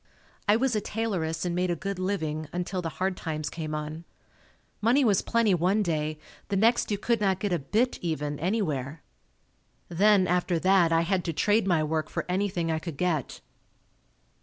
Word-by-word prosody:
I 205 Hz, -, +5 dB
was 245 Hz, 0 st, +1 dB
a 210 Hz, -, +1 dB
tailoress 180 Hz, -8 st, -2 dB
and 175 Hz, -, -1 dB
made 180 Hz, +1 st, 0 dB
a 175 Hz, -, +1 dB
good 195 Hz, +3 st, -4 dB
living 160 Hz, -5 st, -2 dB
until 180 Hz, +1 st, -3 dB
the 165 Hz, -, -3 dB
hard 190 Hz, 0 st, 0 dB
times 155 Hz, -3 st, -4 dB
came 155 Hz, -2 st, -4 dB
on. 155 Hz, +2 st, -5 dB, 0.8 s
Money 250 Hz, +6 st, +4 dB
was 205 Hz, -4 st, +3 dB
plenty 230 Hz, -4 st, +2 dB
one 185 Hz, +5 st, +2 dB
day. 155 Hz, -3 st, -1 dB, 0.3 s
The 200 Hz, -, -2 dB
next 230 Hz, +5 st, +3 dB
you 205 Hz, -, 0 dB
could 230 Hz, +2 st, 0 dB
not 190 Hz, -2 st, +2 dB
get 200 Hz, -2 st, -1 dB
a 175 Hz, -, +1 dB
"bit" 220 Hz, -, 0 dB
even, 150 Hz, -4 st, -2 dB
anywhere. 155 Hz, -, -2 dB, 0.9 s
Then, 195 Hz, +2 st, +4 dB
after 180 Hz, 0 st, +1 dB
that, 185 Hz, -1 st, +4 dB
I 165 Hz, 0 st, +4 dB
had 180 Hz, +1 st, 0 dB
to 165 Hz, -, -1 dB
trade 210 Hz, +5 st, +2 dB
my 170 Hz, -4 st, +3 dB
work 155 Hz, 0 st, -1 dB
for -, -, -3 dB
anything 180 Hz, -3 st, -1 dB
I 160 Hz, -, 0 dB
could 160 Hz, -3 st, -7 dB
get. 165 Hz, -6 st, -1 dB
180 Hz, 185 wpm, -27 LUFS, 160-205 Hz, 0.9 s, I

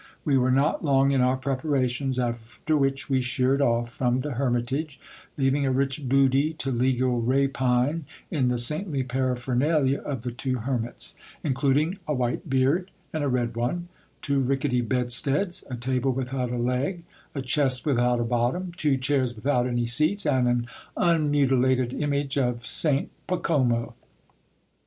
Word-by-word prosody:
We 145 Hz, -, +2 dB
were 130 Hz, -1 st, +3 dB
not 135 Hz, +4 st, +2 dB
long 135 Hz, -2 st, +3 dB
in 135 Hz, -2 st, +2 dB
our 130 Hz, +1 st, +2 dB
preparations, 130 Hz, -1 st, -1 dB
after 120 Hz, +5 st, -2 dB
which 135 Hz, -2 st, 0 dB
we 130 Hz, -2 st, +1 dB
sheered 130 Hz, +2 st, +1 dB
off 120 Hz, -2 st, +1 dB
from 125 Hz, 0 st, +1 dB
the 145 Hz, +3 st, -3 dB
hermit 120 Hz, -1 st, -1 dB
age, 150 Hz, 0 st, -3 dB, 0.4 s
leaving 135 Hz, +1 st, +2 dB
a 135 Hz, -, +1 dB
rich 135 Hz, 0 st, -1 dB
booty 135 Hz, +3 st, +3 dB
to 135 Hz, -3 st, -3 dB
legal 125 Hz, 0 st, +1 dB
rapine 135 Hz, +3 st, +1 dB, 0.3 s
in 140 Hz, -6 st, +1 dB
the 125 Hz, 0 st, +1 dB
saintly 145 Hz, +4 st, 0 dB
paraphernalia 130 Hz, +3 st, 0 dB
of 135 Hz, -6 st, -5 dB
the 125 Hz, -, -3 dB
two 130 Hz, +2 st, -2 dB
hermits; 120 Hz, -1 st, -3 dB, 0.3 s
including 145 Hz, +6 st, +1 dB
a 150 Hz, -, 0 dB
white 125 Hz, +1 st, -2 dB
beard 135 Hz, +8 st, +2 dB, 0.2 s
and 155 Hz, -2 st, -1 dB
a 145 Hz, -, +1 dB
red 120 Hz, -2 st, -1 dB
one, 170 Hz, +10 st, -2 dB, 0.3 s
two 140 Hz, -1 st, +1 dB
rickety 135 Hz, -1 st, +1 dB
bedsteads, 130 Hz, -, 0 dB
a 125 Hz, -, -3 dB
table 130 Hz, +2 st, 0 dB
without 130 Hz, -1 st, -2 dB
a 125 Hz, -, -3 dB
leg, 125 Hz, +9 st, -1 dB, 0.3 s
a 135 Hz, -, -3 dB
chest 130 Hz, 0 st, +1 dB
without 125 Hz, -4 st, +2 dB
a -, -, +1 dB
bottom, 120 Hz, +10 st, -1 dB
two 150 Hz, -5 st, +1 dB
chairs 130 Hz, -2 st, 0 dB
without 125 Hz, +2 st, +1 dB
any 120 Hz, -1 st, 0 dB
seats, 155 Hz, -, +2 dB
and 130 Hz, -4 st, +2 dB
an 120 Hz, -1 st, +1 dB, 0.3 s
unmutilated 135 Hz, -6 st, +2 dB
image 140 Hz, -1 st, -1 dB
of 125 Hz, -2 st, -1 dB
St 145 Hz, -3 st, +1 dB, 0.2 s
Pacomo. 125 Hz, -10 st, +1 dB
130 Hz, 155 wpm, -25 LUFS, 125-140 Hz, 0.4 s, were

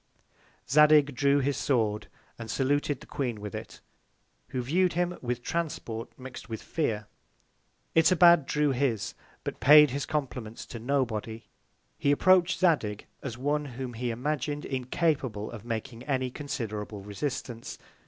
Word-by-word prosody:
Zadig 150 Hz, 0 st, +6 dB
drew 140 Hz, +2 st, +3 dB
his 140 Hz, +1 st, 0 dB
Sword, 110 Hz, -6 st, 0 dB, 0.3 s
and 115 Hz, -1 st, -7 dB
saluted 145 Hz, +1 st, 0 dB
the -, -, -11 dB
Queen 120 Hz, -6 st, -3 dB
with 105 Hz, -1 st, -7 dB
it, -, -, -8 dB, 0.7 s
who 125 Hz, -1 st, -3 dB
view'd 175 Hz, +8 st, +2 dB
him 175 Hz, +1 st, 0 dB
with 125 Hz, -1 st, -3 dB
Transport 145 Hz, -9 st, -3 dB
mix'd 130 Hz, 0 st, -9 dB
with 110 Hz, -2 st, -5 dB
Fear. 110 Hz, -10 st, -2 dB, 0.9 s
Itobad 170 Hz, -2 st, +6 dB
drew 150 Hz, -1 st, +2 dB
his, 125 Hz, -5 st, 0 dB, 0.3 s
but -, -, -5 dB
paid 150 Hz, 0 st, +8 dB
his 140 Hz, +1 st, -3 dB
Compliments 125 Hz, -7 st, -4 dB
to 115 Hz, -, -8 dB
Nobody. 115 Hz, -3 st, -1 dB, 0.6 s
He 140 Hz, -, +1 dB
approach'd 185 Hz, +4 st, +4 dB
Zadig, 140 Hz, -, +1 dB, 0.2 s
as 120 Hz, -4 st, -5 dB
one, 145 Hz, +3 st, 0 dB
whom 130 Hz, -2 st, -4 dB
he 120 Hz, +2 st, -3 dB
imagin'd 145 Hz, +4 st, -2 dB
incapable 130 Hz, -4 st, -1 dB
of 115 Hz, -4 st, -9 dB
making 115 Hz, +1 st, -4 dB
any 130 Hz, -3 st, -1 dB
considerable 110 Hz, -7 st, -5 dB
Resistance. 120 Hz, +3 st, -5 dB
130 Hz, 135 wpm, -28 LUFS, 115-150 Hz, 0.9 s, paid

